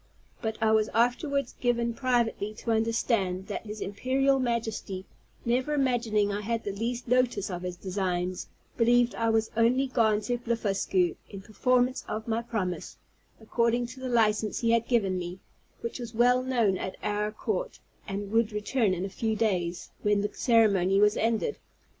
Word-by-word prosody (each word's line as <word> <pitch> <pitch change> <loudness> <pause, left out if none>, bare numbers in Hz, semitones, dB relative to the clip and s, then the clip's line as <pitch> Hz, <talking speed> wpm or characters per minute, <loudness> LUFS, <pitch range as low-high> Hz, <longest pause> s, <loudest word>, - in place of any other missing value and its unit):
But 220 -1 -2
I 220 - +4
was 215 -1 +3
afterwards 255 +3 +1
given 235 -1 +1
privately 235 -4 0
to 230 - -3
understand 220 -4 0
that 210 - -5
his 210 +1 -6
Imperial 265 +6 +1
Majesty, 225 -6 -2 0.4
never 255 +5 +1
imagining 230 -7 +1
I 205 +1 -2
had 230 +2 -2
the 205 - -3
least 235 +5 -3
notice 245 -5 +1
of 175 -1 -4
his 180 -1 -4
designs, 185 -1 -2 0.3
believed 240 +1 +4
I 230 0 0
was 225 0 +1
only 240 +4 +3
gone 220 -5 +2
to 245 +2 -2
Blefuscu, 200 -6 0
in 195 -2 -8
performance 250 +4 +1
of 220 +1 -4
my 225 0 0
promise, 210 -7 -4 0.4
according 235 +2 +1
to 245 +2 -10
the 260 0 -4
licence 215 -2 +2
he 230 -1 +2
had 230 0 +2
given 195 -7 +1
me, 175 +1 -5 0.4
which 235 +2 -4
was 235 -2 -7
well 245 +2 +4
known 235 -7 +1
at 185 - -4
our 210 0 -1
court, - - -3 0.3
and 200 0 -4
would 225 0 +2
return 210 -1 0
in 180 +2 -3
a - - -2
few 220 +3 -2
days, 180 -6 -1
when 210 -1 +2
the 205 - -3
ceremony 200 -6 +3
was 210 0 +4
ended. 230 - 0
225 Hz, 165 wpm, -28 LUFS, 205-240 Hz, 0.4 s, I